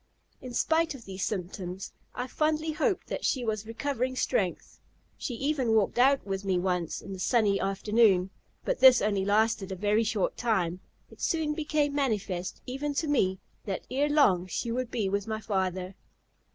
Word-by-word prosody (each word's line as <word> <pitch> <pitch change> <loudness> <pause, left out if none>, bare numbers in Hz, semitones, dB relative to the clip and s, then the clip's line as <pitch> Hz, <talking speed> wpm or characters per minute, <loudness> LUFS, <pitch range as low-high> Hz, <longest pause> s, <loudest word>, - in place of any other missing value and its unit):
In 255 - -7
spite 320 +2 +2
of 240 - -12
these 190 -1 -5
symptoms 185 -1 -4 0.2
I 250 - -2
fondly 310 +3 0
hoped 330 +5 0
that - - -4
she 255 -3 0
was 215 -1 -2
recovering 255 +2 -2
strength. - - -1 0.4
She 245 - -4
even 265 -3 +1
walked 215 +2 +2
out 275 +2 +4
with 195 -1 -3
me 190 -2 +1
twice, 180 -2 -1
in 195 - -8
the 190 - -7
sunny 205 -1 +2
afternoon. 195 -1 +2 0.3
But - - 0
this 260 -2 +8
only 200 -2 +1
lasted 205 -1 +2
a - - -2
very 210 +4 +2
short 215 -3 -1
time; 185 -7 0 0.3
it - - -15
soon 315 -2 0
became 300 -2 0
manifest, 210 -10 -2
even 280 +3 -3
to 315 - 0
me, 190 -10 +2 0.3
that 195 -3 -4
ere 285 +3 +1
long 195 - +4
she 230 +5 -3
would 250 0 -2
be 220 -4 -1
with 200 +2 -1
my 220 -1 -2
father. 190 -3 -2
220 Hz, 175 wpm, -28 LUFS, 195-275 Hz, 0.4 s, this